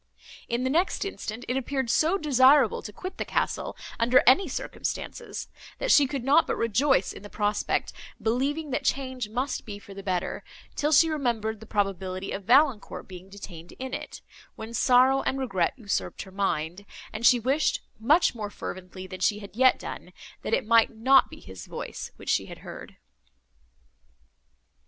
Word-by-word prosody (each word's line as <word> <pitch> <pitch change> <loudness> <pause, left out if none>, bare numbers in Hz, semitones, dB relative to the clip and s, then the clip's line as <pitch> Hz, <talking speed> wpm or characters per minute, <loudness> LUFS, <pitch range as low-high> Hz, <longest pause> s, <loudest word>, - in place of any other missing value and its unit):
In 240 +1 0
the 260 - 0
next 345 +6 +1
instant, 245 - -6
it 250 - -1
appeared 265 -2 -1
so 330 +5 +3
desirable 270 - +4
to - - -8
quit 370 - -7
the - - 0
castle, - - -2 0.2
under 240 +2 +5
any 305 +9 +6
circumstances, 265 - -5 0.3
that - - 0
she 285 -2 +6
could 270 -2 -4
not 285 +5 +4
but - - 0
rejoice 230 -1 +2
in - - -11
the 205 - -10
prospect, 205 0 -1 0.3
believing 270 +7 -1
that 255 - -1
change 260 -4 -2
must 255 +5 -2
be 205 -3 -7
for 200 -1 -13
the 195 - -8
better, 185 -2 -2 0.3
till 295 +1 0
she 320 +2 +6
remembered 235 -8 -1
the 220 - -12
probability 195 -2 -2
of 195 -1 -5
Valancourt 255 -1 +3
being 185 0 -11
detained 180 -4 -10
in 260 0 -7
it, - - -6 0.3
when 220 +1 -8
sorrow 255 +2 +4
and 270 - -1
regret 195 -10 0
usurped 210 -5 -3
her 190 - -14
mind, 185 -2 -2 0.3
and 215 +2 -5
she 245 0 +6
wished, 270 +6 +1 0.2
much 295 +10 +4
more 215 -3 -5
fervently 185 -1 -7
than 185 0 -8
she 205 +3 +2
had 205 -1 -11
yet 260 +2 +5
done, - - -8 0.3
that - - +1
it - - -2
might 230 0 +5
not 260 +4 +4
be - - -12
his 95 -3 -11
voice - - -6
which - - -9
she - - +1
had - - -9
heard. - - -10
235 Hz, 175 wpm, -27 LUFS, 200-270 Hz, 0.3 s, any